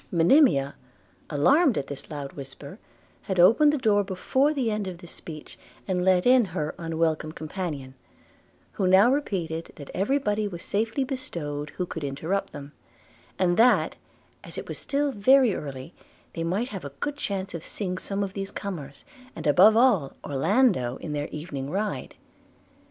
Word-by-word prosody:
Monimia, 165 - +4 0.6
alarmed 250 - +4
at 135 - -1
the 140 -1 -8
loud 145 -2 -6
whisper, 140 - -10 0.4
had 190 -2 -3
opened 230 +12 +6
the 300 - 0
door 210 -6 +3
before 235 +9 +1
the 260 -7 0
end 210 -2 -2
of 180 -2 -6
this 170 -1 -11
speech, 155 -2 -10 0.3
and 180 -2 0
let 185 -1 +3
in 250 0 +6
her 165 -6 -3
unwelcome 160 -2 -1
companion, 155 -5 -5 0.8
who 190 - -1
now 195 +6 +6
repeated, 170 - -3
that 145 - -10
every 210 +9 +1
body 210 -5 -1
was 175 -4 -7
safely 220 +6 -1
bestowed 160 - -5
who 180 - -1
could 160 -3 -6
interrupt 155 +8 -2
them; 145 -1 -9 0.7
and 175 -2 +2
that, 245 +2 +4 0.5
as - - -9
it - - -6
was - - -6
still 285 0 0
very 255 +1 +4
early, 140 +1 -7 0.4
they 165 - -3
might 195 +9 -1
have 195 -3 -7
a 140 - -5
good 290 0 -2
chance 195 -8 -4
of 165 -2 -6
seeing 185 -3 -4
some 200 0 -1
of 195 -1 -5
these 195 0 -4
comers, 155 -10 -7 0.3
and 160 - -7
above 190 +9 +6
all 220 - +3
Orlando, 150 - +2
in 150 - -6
their 145 0 -2
evening 145 -3 -6
ride. 205 +6 -3
185 Hz, 165 wpm, -26 LUFS, 155-215 Hz, 0.8 s, opened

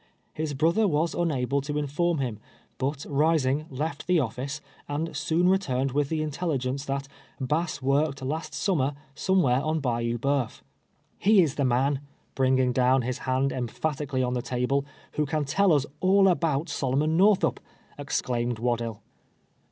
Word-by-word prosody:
His 155 -2 -3
brother 170 +9 +3
was 160 0 +1
unable 140 -5 0
to 145 +2 -3
inform 150 +4 0
him, 120 -6 -3 0.4
but 140 +2 -2
rising, 150 0 +2
left 145 +2 -4
the 180 -1 +4
ofiice, 135 +2 -2 0.3
and 150 +2 -3
soon 160 +4 +1
returned 135 -9 +1
with 140 +1 0
the 160 -1 -1
intellijjence 140 -4 -2
that 140 0 -2 0.2
" - - -32
Bass 150 +2 -1
work 140 +1 +1
ed 130 - -6
last 150 +2 -3
summer 145 -3 0 0.2
somewhere 140 -7 +2
on 155 +2 0
Bayou 120 -3 -1
Bceuf." 135 -1 -1 0.6
"He 200 -1 +5
is 150 -5 -1
the 140 - 0
man," 130 +3 +1 0.3
'bringing 130 -1 +2
down 130 +1 +3
his 125 +1 -3
hand 130 +1 +2
emphat 135 +4 -2
ically 130 -2 0
on 125 - -1
the 125 - -1
table,'" 125 +3 -1 0.2
who 150 -1 -1
can 150 +1 -1
tell 195 +7 +3
us 145 -3 +3
all 195 +1 +5
about 165 -4 +1
Sol 130 -5 -1
omon 155 +3 +2
ISTorthup," 200 +1 +4 0.4
exclaimed 120 -1 -1
Waddill. 115 -2 -2
140 Hz, 160 wpm, -27 LUFS, 130-160 Hz, 0.6 s, He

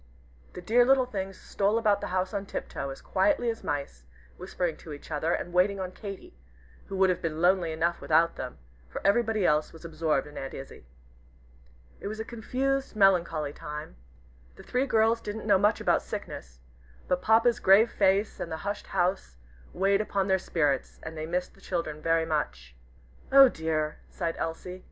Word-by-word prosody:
The 180 - -8
dear 240 +6 +4
little 260 +1 +4
things 195 -5 -5
stole 205 +2 0
about 210 -3 +2
the - - -3
house 185 +1 -1
on 200 -1 -3
tiptoe, 140 - -5
as 135 - -9
quietly 280 -6 +2
as 225 - -9
mice, 140 - -4 0.3
whispering 170 - -3
to 155 - -9
each 145 - -11
other, 155 +2 0
and 175 - -2
waiting 195 +2 +3
on 185 -1 -4
Katy, 195 - -9 0.5
who 195 - -5
would 190 -1 +4
have 180 - -3
been 160 -2 -3
lonely 175 -1 +3
enough 170 +2 -1
without 165 +2 +3
them, 125 -1 -6 0.3
for - - -5
everybody 215 -1 +2
else 150 -1 +2
was 165 +1 -13
absorbed 155 -3 0
in 150 0 -9
Aunt 135 - -6
Izzie. 135 - -10 1.1
It - - -6
was 215 +1 -5
a 220 - -3
confused, 265 +3 -2
melancholy 170 -7 +3
time. 150 - -7 0.6
The - - -13
three 255 +2 0
girls 225 -1 +3
didn't 210 +1 -6
know 200 -3 +4
much 210 +3 +3
about - - +2
sickness, 60 0 -8 0.5
but 180 0 0
Papa's 225 +3 +4
grave 200 +5 +5
face, 200 +1 +2
and 170 - -5
the 160 - -3
hushed 205 0 -3
house, 175 - -1 0.3
weighed 195 +2 +2
upon 200 -2 -1
their 190 -1 +3
spirits, 145 -7 -1
and 160 0 -7
they 155 0 -5
missed 180 +2 -2
the 195 - -21
children 155 -5 -3
very 165 0 +2
much. 65 - -3 0.6
"Oh 270 -1 +9
dear!" 155 -4 -2
sighed 165 -2 -3
Elsie. 180 +3 -4
180 Hz, 180 wpm, -28 LUFS, 155-210 Hz, 1.1 s, Oh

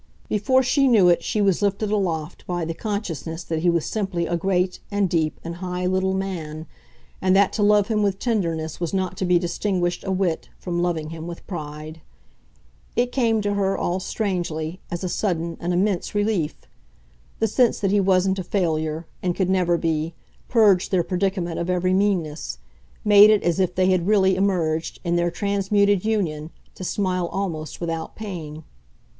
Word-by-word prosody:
Before 260 +6 +3
she 275 +2 +3
knew 210 -8 +6
it 170 -1 +3
she 215 - 0
was 195 -2 +2
lifted 205 +1 0
aloft 175 -6 -2
by 175 -2 -2
the 165 - -3
consciousness 175 -5 -4
that 160 -1 -2
he 175 +2 +2
was 170 -2 +1
simply 190 -5 -2
a 170 - -1
great 180 +1 0
and 205 -2 +1
deep 160 -3 0
and 170 0 -6
high 180 0 -3
little 190 +1 +1
man, 165 -5 -4 0.6
and 185 0 +3
that 200 0 +4
to 215 - -1
love 205 -1 +4
him 215 -2 +1
with 200 -2 +1
tenderness 165 -9 -1
was 170 +1 -2
not 185 -1 -1
to 190 - -1
be 180 0 +4
distinguished, 175 0 -1
a 190 - -2
whit, 185 -4 -1
from 175 -1 -3
loving 165 -3 -1
him 165 0 -7
with 170 -1 -8
pride. 155 -2 -7 0.9
It 245 0 +1
came 230 -4 +2
to 205 0 0
her, 195 -1 0
all 180 +2 -1
strangely, 175 -5 -3
as 175 +1 -4
a - - 0
sudden, 170 -3 -1
an 175 - -2
immense 185 +2 0
relief. 205 -7 0 0.8
The 225 - +1
sense 240 +3 +2
that 195 -2 +1
he 205 - +4
wasn't 190 0 +2
a - - -2
failure, 160 -4 -1 0.2
and 180 -1 -1
could 190 -1 0
never 175 -2 +2
be, 160 0 -1 0.3
purged 210 -6 +4
their 185 -3 +2
predicament 180 -2 -1
of 170 - -3
every 180 0 +1
meanness 175 - 0 0.5
made 205 0 +8
it 215 -1 +4
as 175 +1 +1
if 180 -1 +1
they 185 0 +3
had 180 -1 +1
really 190 -3 +4
emerged, 170 -5 0
in 170 -1 0
their 175 0 +2
transmuted 200 +1 +1
union, 170 -9 -1 0.2
to - - -9
smile 185 -2 -1
almost 165 -6 -4
without 165 -1 -4
pain. 160 -7 -7
185 Hz, 180 wpm, -23 LUFS, 170-200 Hz, 0.9 s, made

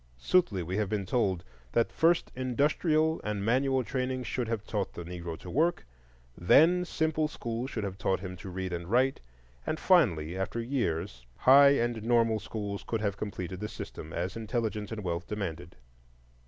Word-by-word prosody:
Soothly 100 - +2
we 90 +4 -3
have 105 -2 0
been 105 -2 -1
told 95 -5 0 0.3
that 115 - +2
first 165 +1 +2
industrial 155 +5 +1
and 105 -1 -2
manual 130 +2 +2
training 130 +1 -2
should 125 0 -2
have 110 -2 -3
taught 105 -3 -2
the 85 - -7
Negro 85 -1 -6
to - - -12
work, 160 - +1 0.5
then 170 - +5
simple 160 -2 0
schools 120 -3 -4
should 110 -5 -4
have 100 -1 -5
taught 95 0 +1
him 95 -1 -6
to 95 - -8
read 95 0 -4
and 85 0 -4
write, 130 +4 +2 0.4
and - - -2
finally, 80 +1 +3
after 95 +5 -3
years, 85 - -2
high 140 +2 +7
and 120 -3 0
normal 115 -1 +2
schools 105 -1 -5
could 115 -2 -2
have 100 -3 0
completed 95 -3 -5
the 105 +1 -4
system, 80 - -8
as 90 +4 -3
intelligence 110 -1 -3
and 110 -2 -5
wealth 85 0 -3
demanded. 90 -4 -5
110 Hz, 170 wpm, -29 LUFS, 95-130 Hz, 0.5 s, high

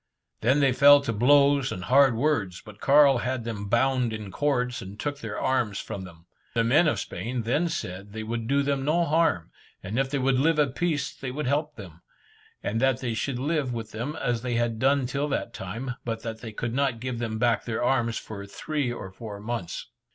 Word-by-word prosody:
They 125 +5 +3
then 135 -2 +4
fell 145 +2 +8
to 140 -5 -2
blows 140 +3 +4
and 90 - -5
hard 130 +3 +5
words, 115 -9 0
but 105 -1 -12
Carl 140 -2 +6
had 125 0 -2
them 105 -3 -5
bound 125 0 +2
in 105 -3 -6
cords, 125 -3 0
and 100 +2 -9
took 145 -1 -3
their 110 -2 -5
arms 120 -6 0
from 95 -2 -6
them. 85 -2 -14 0.3
The 115 - +3
men 150 +9 +4
of 115 -9 +1
Spain 115 +6 -4
then 145 +10 +1
said 100 - -5
they 110 +1 -5
would 115 +1 -3
do 140 +2 +2
them 140 -1 0
no 165 +4 +2
harm, 160 - +1 0.3
and 105 +7 -2
if 135 0 +1
they 140 - -1
would 130 -1 +2
live 160 +3 +3
at 145 -4 +2
peace 150 -4 -1
they 135 - -6
would 150 +4 -4
help 150 +3 0
them, 90 -5 -11 0.6
and 115 +3 -1
that 130 -1 +2
they 120 -3 -2
should 125 +4 -2
live 140 -1 -1
with 115 -1 -6
them 120 +8 -4
as 120 -2 -1
they 125 -1 -2
had 115 -1 0
done 135 +1 +3
till 140 +4 -1
that 125 -4 -2
time, 115 +8 -5
but 115 -1 -4
they 115 0 -6
could 115 +2 -4
not 135 -3 0
give 125 -1 -4
them 110 -2 -2
back 120 0 +1
their 115 0 -2
arms 120 -3 +1
for 100 -2 -7
three 145 +4 -2
or 95 -5 -7
four 100 +1 -8
months. 105 -5 -4
125 Hz, 215 wpm, -26 LUFS, 110-140 Hz, 0.6 s, fell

